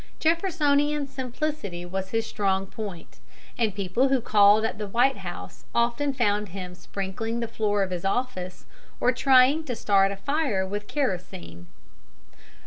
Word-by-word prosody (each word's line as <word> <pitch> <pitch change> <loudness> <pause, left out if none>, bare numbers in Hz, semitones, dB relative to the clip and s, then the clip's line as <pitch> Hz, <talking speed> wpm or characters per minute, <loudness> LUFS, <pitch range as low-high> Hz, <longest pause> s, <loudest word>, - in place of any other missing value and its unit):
Jeffersonian 300 -4 +2
simplicity 260 - -4
was 190 +1 -4
his 225 0 -1
strong 195 -3 0
point, 195 -4 -8 0.4
and 220 -4 0
people 200 +6 +1
who 270 -1 +2
called 210 -1 +5
at 220 - -3
the 210 - -3
White 245 +6 +2
House - - -8
often 235 +5 +1
found 210 -5 0
him 180 0 -7
sprinkling 195 +5 -4
the 230 - -2
floor 210 -3 0
of 190 - -4
his 180 -1 -3
office, 195 -4 -2 0.3
or 250 - +3
trying 265 +4 +5
to 250 -5 -3
start 195 -2 +3
a - - -4
fire 250 -4 0
with 205 +2 -5
kerosene. 175 - -4
215 Hz, 145 wpm, -26 LUFS, 195-265 Hz, 0.4 s, called